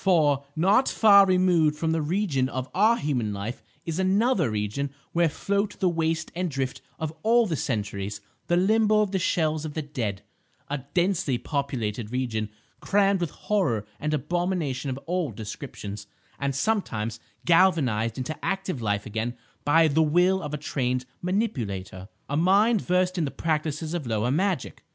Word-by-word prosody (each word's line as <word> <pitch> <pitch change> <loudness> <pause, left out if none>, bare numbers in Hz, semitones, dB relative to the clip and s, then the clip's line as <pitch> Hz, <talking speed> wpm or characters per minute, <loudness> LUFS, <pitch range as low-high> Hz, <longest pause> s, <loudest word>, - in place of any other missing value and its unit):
For, 150 -7 +3
not 195 +11 +3
far 200 -3 +6
removed 180 -5 +3
from 160 +1 -1
the 160 -1 +1
region 150 -5 0
of 130 -1 -4
our 220 +5 +4
human 125 - -1
life 100 +5 -5 0.2
is 165 +1 -3
another 195 - +2
region 105 +6 -2 0.2
where 170 -1 +3
float 200 +6 -2
the 185 - +3
waste 165 -1 -1
and 180 +1 -2
drift 135 -3 -3 0.2
of 160 -1 -3
all 235 +2 +4
the 170 -6 -1
centuries, 105 -8 -3 0.3
the 175 - +2
limbo 215 +3 +4
of 205 -2 0
the 190 - 0
shells 155 -4 +1
of 155 -2 -6
the 155 - -2
dead; 115 -9 -4 0.4
a 145 0 -2 0.2
densely 175 -7 +1
populated 120 -7 -3
region 115 -4 -2 0.3
crammed 200 -1 +2
with 170 - 0
horror 140 - -1
and 150 - -2
abomination 155 -3 -1
of 130 - -3
all 175 -2 -1
descriptions, 105 -1 -7 0.3
and 140 -1 -1
sometimes 115 - -1 0.3
galvanised 140 - +3
into 130 +5 -3
active 190 -8 -2
life 105 -2 -1
again 110 +3 -3 0.3
by 160 +3 +5
the 155 +2 +2
will 180 +5 +3
of 150 - -5
a 150 - -2
trained 130 -3 -1 0.2
manipulator, 110 - -2 0.2
a 145 - -2
mind 200 +6 +4
versed 180 0 +1
in 160 - +1
the - - -2
practices 155 +1 -2
of 165 -7 -3
lower 110 +2 0
magic. 185 0 -1
155 Hz, 160 wpm, -26 LUFS, 125-185 Hz, 0.4 s, far